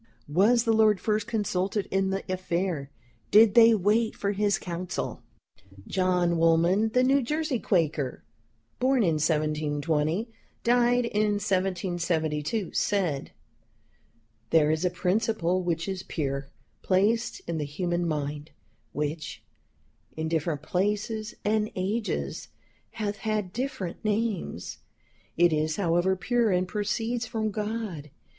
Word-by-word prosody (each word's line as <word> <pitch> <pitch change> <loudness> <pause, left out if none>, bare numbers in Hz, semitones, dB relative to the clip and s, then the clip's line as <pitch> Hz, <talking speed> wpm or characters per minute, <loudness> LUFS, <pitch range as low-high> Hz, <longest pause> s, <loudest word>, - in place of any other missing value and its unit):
Was 225 +7 +4
the 225 -2 +2
Lord 215 -3 +4
first 215 -1 0
consulted 205 -3 -1
in 195 0 +1
the 195 0 -2
affair? 180 -5 -2 0.4
Did 215 0 +7
they 230 0 +7
wait 215 +3 +1
for 200 - -1
his 205 0 +1
Counsell?" 180 0 -4 0.6
John 180 -2 +1
Woolman, 170 +6 +3
the 250 - +4
New 275 +2 +4
Jersey 300 0 -1
Quaker 155 - 0 0.6
(born 255 -1 +3
in 165 -4 +1
1720, 155 - 0 0.4
died 245 0 +3
in 210 -2 +1
1772), 180 -3 -1
said, 180 -9 0 1.2
"There 155 -2 +4
is 160 +2 0
a 180 - +3
principle 185 0 0
which 170 -1 -2
is 190 -1 -3
pure, 140 -5 -3 0.3
placed 210 +5 +1
in 165 -1 -3
the - - -1
human 175 +4 -2
mind, 150 0 -3 0.4
which, 150 +2 -4 0.7
in 160 0 -2
different 160 -2 -1
places 210 +5 -1
and 215 0 +1
ages 205 +4 -2 0.5
hath 210 -2 -3
had 210 -4 -2
different 235 -10 -4
names; 215 - -2 0.6
it 175 -1 +5
is, 155 0 0
however, 175 +1 +2
pure, 235 +4 +1
and 180 -1 +1
proceeds 225 +4 -2
from 220 -2 -2
God. 210 -7 -4
190 Hz, 120 wpm, -27 LUFS, 165-215 Hz, 1.2 s, Did